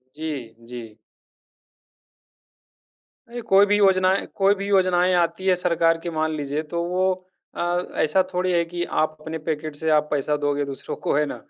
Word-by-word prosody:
जी, 140 -8 -5
जी। 115 -3 -9 2.3
अरे! 240 0 -6
कोई 200 -2 +5
भी 205 0 +2
योजनाएँ 190 -1 +3
कोई 195 +1 +4
भी 200 0 -5
योजनाएँ 185 -2 +3
आती 175 +2 0
है 185 - +5
सरकार 170 -2 +2
की 170 - -3
मान 155 -1 -1
लीजिए 145 0 -2
तो 170 - 0
वो 180 +2 -1 0.5
अ, - - -3 0.4
ऐसा 170 +5 +3
थोड़ी 180 0 0
है 170 -1 +2
कि 175 +1 -4 0.2
आप 155 0 -2
अपने 160 +1 -5
पैकेट 155 -1 -3
से 160 +2 -2
आप 150 0 +3
पैसा 150 0 0
दोगे 145 0 0
दूसरों 140 -1 -6
को - - +2
है 150 0 +2
ना? - - -5
170 Hz, 170 wpm, -23 LUFS, 150-185 Hz, 2.3 s, कोई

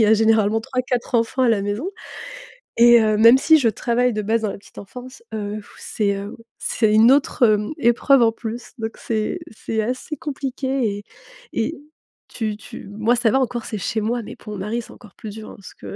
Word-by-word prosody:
il - - +6
y - - +5
a 215 - +5
généralement 220 0 +3
3-4 255 0 -3
enfants 230 +3 0
à 250 - +4
la 210 -3 +1
maison 210 - -3 0.9
et 235 0 +7
heu, 215 -1 +2
même 230 +4 +7
si 315 +1 +5
je 245 - +2
travaille 240 +3 0
de 215 - -2
base 225 +2 +1
dans 215 - 0
la - - -7
petite - - -21
enfance, 250 - -11
heu, 210 0 -4
f - - -18
c'est, 200 -2 -1
heu, 200 +1 -7 0.2
c'est 220 -2 +1
une 220 +3 +6
autre, 275 -2 +2
hem, 210 +3 +1
épreuve 240 +3 +4
en 225 - +4
plus. 230 +1 -7
Donc 220 0 -3
c'est 220 +10 -2
c'est 220 0 -3
assez 255 +7 -4
compliqué 265 -6 -2
et 205 - -13 0.5
et 225 - -1 0.5
tu 215 -3 -3
tu 215 - -11
moi 220 +4 +1
ça 230 -1 +2
va 265 - +3
encore, 245 -2 -2
c'est 215 - -4
chez 220 - -2
moi, 235 +2 -1
mais - - -9
pour 210 - -9
mon 200 - -6
mari, 215 +5 -2
c'est - - -14
encore 215 -7 -16
plus 215 - -8
dur 220 -1 -9
hein, - - -12
parce 200 - -13
que - - -9
225 Hz, 220 wpm, -21 LUFS, 215-245 Hz, 0.9 s, et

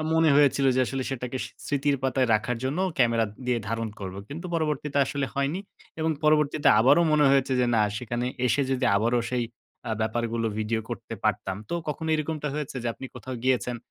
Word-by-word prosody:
মনে 160 -1 +4
হয়েছিল 140 -1 +4
যে, 130 - +4
আসলে 135 0 -2
সেটাকে 125 0 -4
স - - -5 0.2
স্মৃতির 145 0 +1
পাতায় 130 -1 +1
রাখার 115 +3 0
জন্য, 140 +7 -1 0.2
ক্যামেরা 115 -2 +3 0.2
দিয়ে 125 -1 +2
ধারণ 115 0 -2
করব। 95 -1 -5
কিন্তু 165 +6 -6
পরবর্তীতে 150 -3 -1
আসলে 140 0 -2
হয়নি 140 +6 0 0.4
এবং 160 +1 +1
পরবর্তীতে 150 -1 +3
আবারো 140 +7 +6
মনে 150 -1 +4
হয়েছে 135 -1 +3
যে, 125 - +3
"না, 110 - +4 0.2
সেখানে 120 0 -3 0.2
এসে 140 +3 +2
যদি 130 -1 0
আবারো 120 +4 +2
সেই 125 -1 +1 0.4
আ - - -2
ব্যাপারগুলো 115 +1 -1
ভিডিও 110 +1 0
করতে 120 - -5
পারতাম।" 95 -1 0
তো - - -2
কখনো 160 +2 -3
এরকমটা 155 -1 -2
হয়েছে 150 -3 -4
যে, - - -3
আপনি 130 - -8
কোথাও 130 - -7
গিয়েছেন, 125 -1 +1
130 Hz, 185 wpm, -26 LUFS, 120-145 Hz, 0.4 s, আবারো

